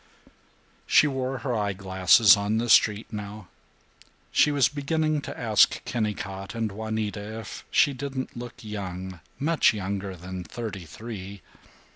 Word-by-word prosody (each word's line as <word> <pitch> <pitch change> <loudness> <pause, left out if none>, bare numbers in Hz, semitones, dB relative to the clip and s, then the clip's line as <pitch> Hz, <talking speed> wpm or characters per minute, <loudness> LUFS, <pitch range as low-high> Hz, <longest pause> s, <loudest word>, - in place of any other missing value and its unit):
She - - +6
wore 135 -2 -2
her 125 +1 -2
eye 105 -2 0
glasses 95 +2 +5
on 100 +2 -1
the 120 +1 -1
street 110 0 +4
now. 105 -2 -7 0.8
She 150 - +4
was 140 -4 +4
beginning 155 +1 -1
to - - -7
ask 110 -3 +3
Kennicott 100 -3 -3
and 115 -2 -1
Juanita 110 0 -4
if 110 -4 -8
she 145 - +4
didn't 130 0 -5
look 120 0 -7
young, 95 -4 -6 0.2
much 155 -5 +3
younger 100 -1 -4
than 90 +1 -7
thirty 100 -3 -6
three. 100 +1 -8
110 Hz, 135 wpm, -26 LUFS, 100-120 Hz, 0.8 s, She